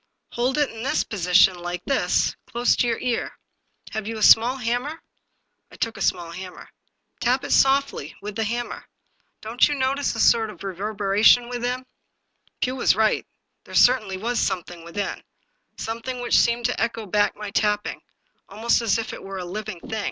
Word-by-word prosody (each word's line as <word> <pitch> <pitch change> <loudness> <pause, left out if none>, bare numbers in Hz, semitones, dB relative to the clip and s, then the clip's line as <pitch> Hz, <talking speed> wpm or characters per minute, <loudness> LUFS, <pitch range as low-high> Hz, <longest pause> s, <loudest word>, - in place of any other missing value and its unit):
Hold 250 +4 0
it 295 -1 +1
in 225 - -9
this 270 +5 0
position 185 -1 +4
— - - -12
like 175 0 -5
this 275 - +1
— - - -52
close 240 +1 +2
to 245 - +2
your 230 -1 0
ear. 245 -2 -2 0.5
Have 220 -1 -4
you 225 0 -4
a 215 - -2
small 240 +5 +6
hammer? 250 +6 -2 0.4
" - - -48
I - - -13
took 230 -1 -2
a 195 - -9
small 170 -3 0
hammer. 180 +1 -9 0.2
" - - -48
Tap 250 +2 +1
it - - -5
softly, 270 - +2
with 205 0 -7
the 225 - -1
hammer. 240 +3 -4 0.6
Don't 225 +3 +2
you 295 - -1
notice 270 0 0
a - - -5
sort 225 0 +4
of 210 - -11
reverberation 205 +4 +2
within? 245 +1 -3 0.4
" - - -41
Pugh 255 +1 0
was 260 - +3
right, 220 0 +1 0.4
there - - -10
certainly 215 -7 +4
was 235 +5 -1
something 175 -3 -3
within; 195 +4 -4 0.6
something 230 +3 -5
which 245 - +3
seemed 235 0 +1
to 245 - 0
echo 225 -1 -2
back 205 +1 +1
my 210 -1 -7
tapping, 210 0 0 0.5
almost 225 +4 +1
as 225 -3 +2
if 225 - -4
it - - -8
were 195 0 -7
a 180 - -5
living 185 -1 -6
thing. 220 - -5
225 Hz, 190 wpm, -23 LUFS, 200-245 Hz, 0.6 s, small